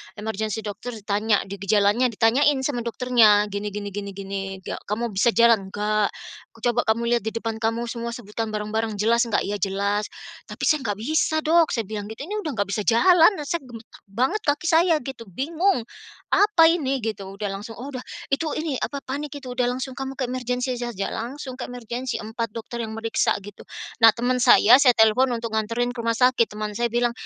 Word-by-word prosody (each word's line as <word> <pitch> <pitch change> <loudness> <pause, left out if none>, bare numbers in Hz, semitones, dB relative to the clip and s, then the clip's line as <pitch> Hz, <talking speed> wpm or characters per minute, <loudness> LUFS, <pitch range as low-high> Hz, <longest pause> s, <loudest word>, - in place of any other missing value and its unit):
emergency 220 0 -3
dokter 210 +4 -6
ditanya 210 0 0
di 200 - -6
gejalanya 205 +5 +3
ditanyain 260 +6 +3
sama 255 -4 -2
dokternya, 230 -4 +4
gini 205 +1 -4
gini 205 -1 -4
gini 200 0 -6
gini 195 0 -5 0.2
nggak, - - -7
"Kamu 230 +3 -2
bisa 230 +5 +3
jalan?" 230 -4 +4
"Nggak," 210 0 +1 0.6
"Coba 240 0 +2
kamu 220 +1 +1 0.2
lihat 230 - -7
di 220 - -1
depan 225 -1 -3
kamu 230 +1 0
semua 235 0 -4
sebutkan 225 -2 -5
barang-barang 215 +1 -2
jelas 235 +3 +3
nggak?" 230 - 0
"iya 205 - -2
jelas, 200 +1 -1 0.4
tapi - - -9
saya 305 -4 +2
nggak 205 -2 -1
bisa, 315 +5 +1
Dok," 325 +1 +3
saya 230 -3 -1
bilang 210 -2 -5
gitu, 220 - -9
"ini 415 - -4
udah 310 - -3
nggak 205 -4 -1
bisa 205 +1 -1
jalan, 335 - +6 0.2
saya 340 +1 -1
gemetar 235 -2 -13
banget 255 - -1
kaki 300 +4 0
saya," 330 +1 +4
gitu, 250 -3 -8
bingung, 325 - 0 0.5
"Apa 400 -6 +5
ini?" 275 -6 0
gitu. 215 -3 -4
Udah 200 0 -4
langsung, 205 +4 -7
"Oh 265 +4 -6
udah 255 -3 -6 0.3
itu, 280 +4 0
ini 310 -4 -2
apa, 280 -1 -4
panik 285 +2 -5
itu, 265 -3 -9
udah 250 0 0
langsung 260 0 -5
kamu 270 0 -4
ke 255 -2 -1
emergency 250 0 -2
saja," 240 -5 -3
langsung 255 +2 -6
ke - - -3
emergency 245 +1 -5
4 220 0 -4
dokter 235 +1 -6
yang 220 -1 -6
meriksa 225 0 0
gitu. 205 0 -11 0.4
Nah 225 - +10
teman 250 +2 0
saya 240 0 +7
saya 250 -3 +6
telepon 220 +4 +4
untuk 230 -1 -5
nganterin 230 +3 -1
ke 240 - -9
rumah 230 0 0
sakit, 250 -2 +4
teman 210 0 -5
saya 235 0 +1
bilang, 240 0 +1
235 Hz, 195 wpm, -23 LUFS, 215-260 Hz, 0.6 s, Nah